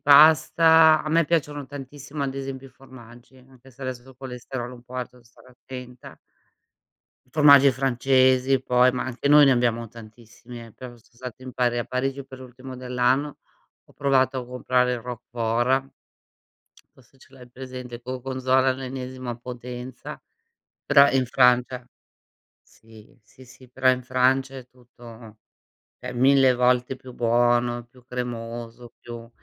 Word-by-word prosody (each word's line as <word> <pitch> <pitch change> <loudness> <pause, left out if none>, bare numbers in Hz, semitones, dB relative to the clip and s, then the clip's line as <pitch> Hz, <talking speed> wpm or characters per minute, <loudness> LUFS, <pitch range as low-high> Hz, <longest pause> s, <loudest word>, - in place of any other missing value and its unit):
pasta. 160 +2 +6
A - - -5
me 165 +2 +3
piacciono 145 -2 -1
tantissimo 145 +1 -8
ad 135 -1 -3
esempio 135 -1 -6
i - - -23
formaggi, 125 -1 -16
anche 130 0 -20
se 130 - -23
adesso 130 -2 -5
col 130 -1 -17
colesterolo 125 -1 -7
è - - -9
un 120 - -15
po' 125 +1 -15
alto 125 -1 -4
devo 125 -1 -21
stare 120 +2 -21
attenta. 125 0 -12 1.1
Formaggi 140 -2 +6
francesi 130 0 +2
poi, 125 0 +3
ma 125 - -3
anche 130 +2 -3
noi 145 0 +7
ne - - +5
abbiamo 120 -2 0
tantissimi, 115 +1 -13
eh, 115 - -17
però 125 +3 -10
son 120 +1 -21
stato 125 +1 -10
in 130 - -9
Pari 120 -1 0
a 120 - -2
Parigi 135 +2 -3
per 130 -1 -13
l'ultimo 130 0 -11
dell'anno, 125 +3 -1 0.5
ho - - -23
provato 135 -1 +1
a 125 - -7
comprare 125 0 0
il 120 - -4
Roquefort 120 +2 -2 1.1
forse 130 +1 -24
ce - - -21
l'hai 125 -2 -15
presente, 125 -1 -9
Gorgonzola 130 +1 -1
all'ennesima 130 -1 -5
potenza, 125 +1 -9 0.6
però 140 0 +6
in 130 -1 +1
Francia. 125 0 +2 0.8
Sì, 110 +4 -19
sì, 130 +4 -19
sì, 125 +1 -17
però 130 0 0
in 125 0 -1
Francia 130 +1 0
è 125 - -13
tutto 115 -3 -15 0.6
cioè 125 0 -7
1000 130 +1 +4
volte 125 +1 +1
più 130 -1 -13
buono, 120 0 +1
più 125 +1 -22
cremoso, 120 -1 -7
più 115 -1 -10
125 Hz, 150 wpm, -24 LUFS, 120-135 Hz, 1.1 s, noi